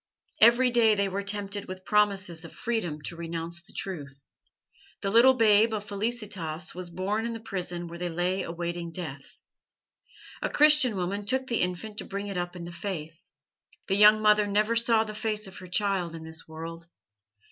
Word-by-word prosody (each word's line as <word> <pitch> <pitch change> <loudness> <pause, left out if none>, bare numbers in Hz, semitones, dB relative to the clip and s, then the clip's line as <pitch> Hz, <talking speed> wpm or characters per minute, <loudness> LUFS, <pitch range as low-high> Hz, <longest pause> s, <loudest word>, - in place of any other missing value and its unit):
Every 240 +3 +6
day 225 -3 +4
they 200 -1 +1
were 195 +1 -3
tempted 200 0 -3
with 185 0 -9
promises 195 -5 +2
of 165 - -10
freedom 175 -11 -3
to 170 - -5
renounce 170 0 -5
the 175 - -14
Truth. 140 -7 -6 0.8
The 195 -1 -1
little 245 +4 +7
babe 220 -1 +4
of 205 - -4
Felicitas 200 -6 -3
was 180 0 -7
born 190 +5 -2
in 235 0 -3
the 225 - -6
prison 180 -5 -4
where 170 +1 -9
they 175 0 -2
lay 180 +3 -1
awaiting 170 0 -4
death. 155 -6 -7 1.0
A - - -1
Christian 300 -6 +6
woman 195 +3 -2
took 260 +3 +1
the 235 -3 -1
infant 180 +4 -3
to - - -5
bring 200 +1 -5
it 200 -1 -5
up 175 0 -3
in 175 - -7
the 170 - -7
Faith. 165 -3 -6 0.6
The 195 - +2
young 210 +1 +7
mother 210 -1 +5
never 210 +3 +1
saw 230 -1 +4
the 215 -1 -7
face 215 0 -2
of 190 -1 -9
her 185 - -10
child 180 -3 -1
in 160 - -8
this 160 0 -7
world. 165 +1 -8
195 Hz, 185 wpm, -27 LUFS, 170-215 Hz, 1.0 s, little